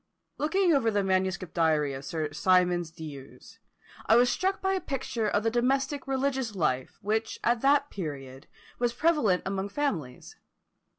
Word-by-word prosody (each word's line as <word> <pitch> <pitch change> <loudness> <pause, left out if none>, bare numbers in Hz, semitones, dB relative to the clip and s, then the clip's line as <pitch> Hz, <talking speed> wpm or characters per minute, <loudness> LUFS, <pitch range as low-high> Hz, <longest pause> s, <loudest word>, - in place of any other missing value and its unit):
Looking 345 +4 +2
over 260 -6 +3
the 205 -2 +1
manuscript 185 -2 -1
diary 155 -4 +2
of 135 +1 -7
Sir 155 +1 -3
Symonds 175 +1 +2
D'Ewes, 150 -5 -11 0.5
I 220 - +6
was 245 +1 +5
struck 380 +1 0
by 385 0 0
a 380 - -1
picture 255 -6 -3
of 205 - 0
the 225 - +1
domestic 270 +3 0
religious 265 -4 -1
life 130 -7 -1
which 220 +2 -1
at 235 0 +2
that 285 +1 +3
period 135 -7 -7 0.3
was 240 -1 +1
prevalent 245 - +2
among 195 +1 -2
families. 185 - -3
210 Hz, 155 wpm, -28 LUFS, 165-270 Hz, 0.5 s, I